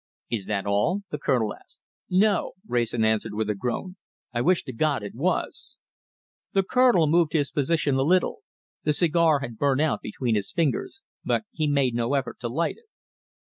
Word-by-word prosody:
"Is 105 Hz, -5 st, -2 dB
that 105 Hz, -2 st, -1 dB
all?" 105 Hz, -, +1 dB
the 150 Hz, -, -3 dB
Colonel 120 Hz, -7 st, +1 dB
asked. -, -, -19 dB, 0.3 s
"No!" 200 Hz, +2 st, +2 dB
Wrayson 120 Hz, -2 st, 0 dB
answered 110 Hz, -1 st, 0 dB
with 110 Hz, 0 st, 0 dB
a -, -, 0 dB
groan. 125 Hz, -, -4 dB, 0.4 s
"I 120 Hz, -, 0 dB
wish 180 Hz, +6 st, +2 dB
to 130 Hz, -, -7 dB
God 140 Hz, -1 st, 0 dB
it 100 Hz, -, -6 dB
was!" 185 Hz, -, -2 dB, 0.8 s
The 195 Hz, -, +3 dB
Colonel 245 Hz, -5 st, +4 dB
moved 160 Hz, +1 st, +2 dB
his 145 Hz, -3 st, +1 dB
position 145 Hz, 0 st, +1 dB
a -, -, +2 dB
little. 180 Hz, +6 st, +2 dB, 0.4 s
The 150 Hz, -, +2 dB
cigar 160 Hz, -2 st, +3 dB
had 120 Hz, -5 st, -7 dB
burnt 140 Hz, -1 st, +2 dB
out 155 Hz, -2 st, +1 dB
between 115 Hz, +2 st, -2 dB
his 105 Hz, -2 st, -1 dB
fingers, 185 Hz, -, -1 dB, 0.2 s
but -, -, 0 dB
he 155 Hz, -1 st, -1 dB
made 140 Hz, -4 st, +2 dB
no 120 Hz, +3 st, 0 dB
effort 135 Hz, -2 st, -2 dB
to 120 Hz, -, -3 dB
light 165 Hz, +8 st, -1 dB
it. 455 Hz, -1 st, -31 dB
145 Hz, 180 wpm, -25 LUFS, 120-170 Hz, 0.8 s, Colonel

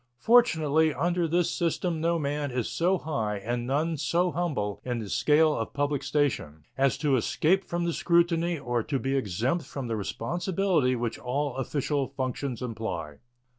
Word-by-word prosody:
Fortunately, 160 Hz, -, +4 dB
under 175 Hz, +2 st, 0 dB
this 170 Hz, +1 st, +1 dB
system 170 Hz, -1 st, -1 dB
no 170 Hz, +1 st, +2 dB
man 145 Hz, -1 st, -2 dB
is 125 Hz, -2 st, -2 dB
so 180 Hz, +3 st, +1 dB
high 115 Hz, -, -2 dB
and 120 Hz, +4 st, -3 dB
none 155 Hz, +4 st, 0 dB
so 170 Hz, +5 st, +1 dB
humble 140 Hz, -, -2 dB
in 125 Hz, -1 st, -2 dB
the 110 Hz, -3 st, -5 dB
scale 150 Hz, +7 st, +3 dB
of 115 Hz, -, -4 dB
public 145 Hz, -1 st, 0 dB
station 125 Hz, -, -1 dB
as 135 Hz, 0 st, +2 dB
to 145 Hz, -4 st, +2 dB
escape 175 Hz, -, +2 dB
from 175 Hz, -1 st, -2 dB
the 170 Hz, -, 0 dB
scrutiny 170 Hz, 0 st, +2 dB
or 120 Hz, -4 st, -1 dB
to 135 Hz, +5 st, -2 dB
be 135 Hz, +1 st, -1 dB
exempt 125 Hz, -, 0 dB
from 135 Hz, -1 st, -6 dB
the 115 Hz, -1 st, -2 dB
responsibility 165 Hz, -, 0 dB
which 120 Hz, -1 st, -3 dB
all 135 Hz, +2 st, -2 dB
official 140 Hz, +1 st, -1 dB
functions 130 Hz, -1 st, -3 dB
imply. 90 Hz, -11 st, -4 dB
145 Hz, 165 wpm, -27 LUFS, 120-170 Hz, -, Fortunately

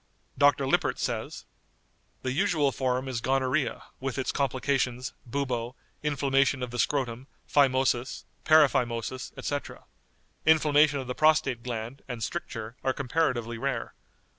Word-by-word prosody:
Dr. 140 Hz, -1 st, +4 dB
Lippert 135 Hz, -, +1 dB
says: -, -, -3 dB, 0.8 s
"The 130 Hz, -, -1 dB
usual 145 Hz, 0 st, +2 dB
form 130 Hz, 0 st, -1 dB
is 125 Hz, -3 st, -3 dB
gonorrhoea, 130 Hz, +1 st, 0 dB, 0.2 s
with 135 Hz, 0 st, -3 dB
its 130 Hz, -, -1 dB
complications, 130 Hz, -2 st, -1 dB
bubo, 125 Hz, -2 st, -2 dB, 0.3 s
inflammation 135 Hz, -2 st, +1 dB
of 125 Hz, -, -4 dB
the 120 Hz, -, -4 dB
scrotum, 130 Hz, -2 st, -1 dB, 0.2 s
phymosis, 130 Hz, -3 st, +2 dB, 0.2 s
paraphymosis, 130 Hz, -5 st, +2 dB
etc. 145 Hz, 0 st, -4 dB, 0.6 s
Inflammation 150 Hz, -2 st, +4 dB
of 135 Hz, -, -4 dB
the 125 Hz, -, -3 dB
prostate 155 Hz, -5 st, +3 dB
gland, 120 Hz, +2 st, -5 dB
and 120 Hz, -3 st, -5 dB
stricture, 115 Hz, -9 st, -5 dB
are 130 Hz, -, +1 dB
comparatively 125 Hz, -5 st, -1 dB
rare. -, -, -2 dB
130 Hz, 120 wpm, -28 LUFS, 125-140 Hz, 0.8 s, Dr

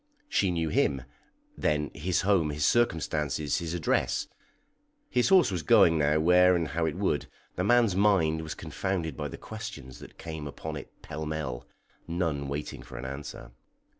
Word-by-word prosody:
She 100 Hz, -, +1 dB
knew 85 Hz, -2 st, 0 dB
him, 70 Hz, -3 st, +1 dB, 0.5 s
then 75 Hz, -1 st, 0 dB
his 90 Hz, +3 st, 0 dB
home, 95 Hz, -6 st, +2 dB
his 75 Hz, 0 st, -1 dB
circumstances, 75 Hz, -, +1 dB
his 85 Hz, 0 st, -4 dB
address. 80 Hz, -5 st, 0 dB, 0.8 s
(His 125 Hz, +5 st, +2 dB
horse 185 Hz, -, +6 dB
was 90 Hz, -3 st, -2 dB
going 80 Hz, +2 st, +5 dB
now 75 Hz, +1 st, +3 dB
where 90 Hz, +2 st, +5 dB
and 85 Hz, -3 st, -1 dB
how 80 Hz, 0 st, 0 dB
it -, -, -2 dB
would; 95 Hz, -7 st, 0 dB, 0.3 s
the 90 Hz, -, -1 dB
man's 115 Hz, -2 st, +4 dB
mind 95 Hz, -6 st, +3 dB
was 80 Hz, -1 st, -5 dB
confounded 80 Hz, 0 st, -3 dB
by -, -, -3 dB
the -, -, -8 dB
questions 100 Hz, -, -8 dB
that -, -, -13 dB
came 80 Hz, -3 st, -6 dB
upon 80 Hz, +2 st, -6 dB
it 70 Hz, -, -8 dB
pell 80 Hz, +1 st, -5 dB
mell, 65 Hz, -6 st, -4 dB, 0.4 s
none 80 Hz, -5 st, -1 dB
waiting 70 Hz, +2 st, -5 dB
for -, -, -10 dB
an -, -, -6 dB
answer.) 70 Hz, -3 st, -7 dB
80 Hz, 165 wpm, -28 LUFS, 75-90 Hz, 0.8 s, horse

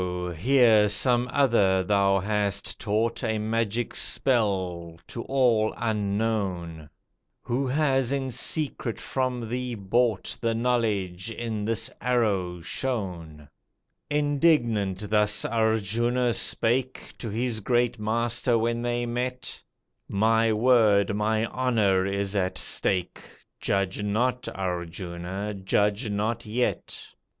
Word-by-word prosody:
here, 115 Hz, -, +4 dB
some 120 Hz, +3 st, +2 dB
other 105 Hz, -9 st, +3 dB
thou 100 Hz, 0 st, +2 dB
hast 100 Hz, 0 st, -1 dB
taught 110 Hz, +3 st, -1 dB
A 110 Hz, -2 st, 0 dB
magic 115 Hz, +1 st, -1 dB
spell, 95 Hz, -9 st, 0 dB
to 115 Hz, -, -6 dB
all 120 Hz, -5 st, +2 dB
unknown; 100 Hz, -7 st, -2 dB, 0.5 s
Who 130 Hz, +3 st, -1 dB
has 135 Hz, -2 st, +1 dB
in 135 Hz, -2 st, -1 dB
secret 135 Hz, -2 st, -1 dB
from 125 Hz, -3 st, -2 dB
thee 125 Hz, +1 st, -3 dB
bought 110 Hz, +2 st, 0 dB
The 115 Hz, -1 st, 0 dB
knowledge, 110 Hz, -6 st, -1 dB
in 110 Hz, -2 st, -4 dB
this 115 Hz, 0 st, -2 dB
arrow 100 Hz, -8 st, 0 dB
shown!" 85 Hz, -, -4 dB, 0.6 s
Indignant 135 Hz, -, +1 dB
thus 105 Hz, 0 st, +4 dB
Arjuna 115 Hz, +2 st, +1 dB
spake 125 Hz, +4 st, +1 dB
To 115 Hz, -, -5 dB
his 115 Hz, +1 st, -1 dB
great 120 Hz, +1 st, 0 dB
Master 115 Hz, +2 st, +1 dB
when 115 Hz, +1 st, 0 dB
they 120 Hz, 0 st, -1 dB
met 125 Hz, +1 st, -4 dB, 0.5 s
"My 110 Hz, +2 st, +2 dB
word, 110 Hz, -3 st, +3 dB
my 110 Hz, +1 st, +1 dB
honour, 110 Hz, -7 st, +1 dB
is 100 Hz, 0 st, -2 dB
at 95 Hz, -2 st, 0 dB
stake, 90 Hz, -2 st, 0 dB, 0.4 s
Judge 100 Hz, 0 st, -1 dB
not, 125 Hz, +5 st, -1 dB
Arjuna, 90 Hz, +2 st, -4 dB
judge 105 Hz, +3 st, 0 dB
not 110 Hz, +3 st, -2 dB
yet. 120 Hz, +3 st, -2 dB
110 Hz, 105 wpm, -26 LUFS, 100-120 Hz, 0.6 s, here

